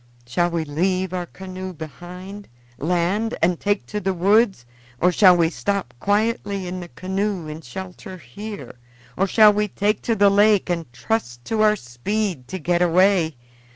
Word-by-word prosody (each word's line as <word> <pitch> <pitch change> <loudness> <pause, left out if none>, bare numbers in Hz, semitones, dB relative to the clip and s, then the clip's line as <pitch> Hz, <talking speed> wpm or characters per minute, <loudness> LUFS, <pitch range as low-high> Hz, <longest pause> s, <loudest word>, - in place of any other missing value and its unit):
Shall 175 +9 +1
we 170 -2 -2
leave 185 +5 -1
our 180 -1 -3
canoe 185 0 -8
behind, 180 +5 -9 0.3
land, 180 - 0
and 170 0 +1
take 205 0 0
to 210 - -4
the 190 -2 -1
woods, 195 - +3 0.3
or 180 - +4
shall 180 -1 +6
we 165 -1 +2
stop 200 -12 -2
quietly 205 - 0
in 180 +1 -5
the 175 - -7
canoe 190 -1 -3
in 155 +1 -7
shelter 185 - -8
here, 200 - -9 0.4
or 195 - +1
shall 210 +1 +6
we 210 0 0
take 205 +2 0
to 230 - 0
the 200 -1 +5
lake 205 -2 +4
and 165 -7 -3
trust 120 - -3
to 220 -1 0
our 215 0 +5
speed 150 - -3
to 190 - -5
get 175 +1 0
away? 180 -2 +3
185 Hz, 165 wpm, -22 LUFS, 170-205 Hz, 0.4 s, shall